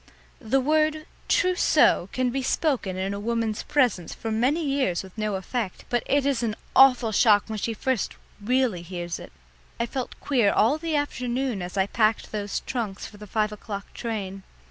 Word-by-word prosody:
The 265 +1 +1
word 310 +2 +1 0.2
"trousseau" 355 - +3
can 255 -1 0
be 270 +2 -1
spoken 255 - 0
in 190 +1 -2
a 200 - -4
woman's 225 0 -1
presence 245 - +1
for 225 - -4
many 265 +9 +1
years 270 -12 0
with 190 -1 -13
no 215 -2 -1
effect, 190 +1 -4
but 240 -1 +2
it 280 0 +2
is 275 -4 +1
an 220 -3 -1 0.2
awful 255 -4 +6
shock 205 -1 +5
when 220 -1 -5
she 225 +2 -2
first 260 0 -1 0.3
really 250 -5 +1
hears 175 -1 -5
it. - - -11 0.5
I 235 - +1
felt 255 +1 -5
queer 240 -8 +2
all 255 +9 +3
the 325 -1 -2
afternoon 255 -5 -1
as 180 +2 -6
I 190 - +3
packed 215 +1 +1
those 205 -1 -3
trunks 220 -6 -4
for 210 - -11
the 210 0 -10
five 215 +1 0
o'clock 205 -1 -7
train. 200 -5 -4
230 Hz, 180 wpm, -25 LUFS, 205-265 Hz, 0.5 s, awful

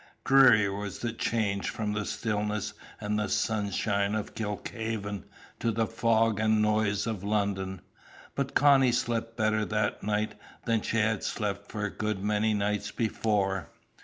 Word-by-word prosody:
Dreary 130 -6 +6
was 100 +1 -4
the 120 -2 -3
change 105 -4 -1
from 105 -2 -2
the 105 0 -2
stillness 105 -2 -2 0.3
and 105 -1 -1
sunshine 100 -1 0
of 110 -1 -3
Kilkhaven 105 -1 -4 0.3
to 115 - 0
the 115 +1 +1
fog 115 -1 +2
and 110 0 +3
noise 105 -1 +2
of 110 -4 -3
London; 100 -3 -1 0.5
but 140 -1 -3
Connie 135 -3 +5
slept 115 -1 -1
better 110 -1 +2
that 105 -1 -1
night 105 +1 -1 0.3
than 115 -2 +2
she 115 - -1
had 110 0 +1
slept 100 -2 -3
for 105 -2 -2
a 105 - -3
good 105 -3 -2
many 105 +1 +1
nights 105 0 -1
before. 105 -4 0
105 Hz, 145 wpm, -29 LUFS, 105-110 Hz, 0.5 s, Dreary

